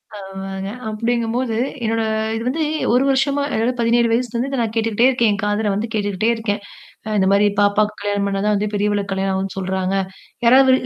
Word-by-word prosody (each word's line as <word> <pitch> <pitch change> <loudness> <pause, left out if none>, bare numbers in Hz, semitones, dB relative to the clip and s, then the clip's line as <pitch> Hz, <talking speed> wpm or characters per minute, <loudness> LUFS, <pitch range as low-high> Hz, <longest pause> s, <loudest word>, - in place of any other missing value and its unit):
அ. - - -7
ஆமாங்க. 195 0 -6 0.2
அப்டிங்கும்போது, 230 +1 -1 0.3
என்னோட 225 +1 0 0.3
இது 225 - -3
வந்து 310 +5 0 0.3
ஒரு 250 - +4
வருஷமா 275 +1 +2
அதாவது 235 0 0
17 235 0 +3
வயசுலருந்து 240 +2 -1
இத 275 - -2
நான் 225 -1 -2
கேட்டுக்கிட்டே 225 +1 +2
இருக்கேன். 240 -4 +2
என் 200 - -2
காதல 210 0 0
வந்து 210 +4 -2
கேட்டுக்கிட்டே 205 +1 0
இருக்கேன். 205 -3 -2 0.5
அ - - -4
இந்த 190 - +3
மாரி 200 +1 +4
"பாப்பாக்கு 205 +1 +2
கல்யாணம் 205 0 0
பண்ணா 195 0 -1
தான் 210 - +3
வந்து 210 +1 -1
பெரியவளுக்கு 205 -1 0
கல்யாணம் 190 0 0
ஆகும்ன்னு 190 0 -3
சொல்றாங்க". 190 0 -1 0.5
யாராவது 260 +2 +6
215 Hz, 180 wpm, -20 LUFS, 200-235 Hz, 0.5 s, யாராவது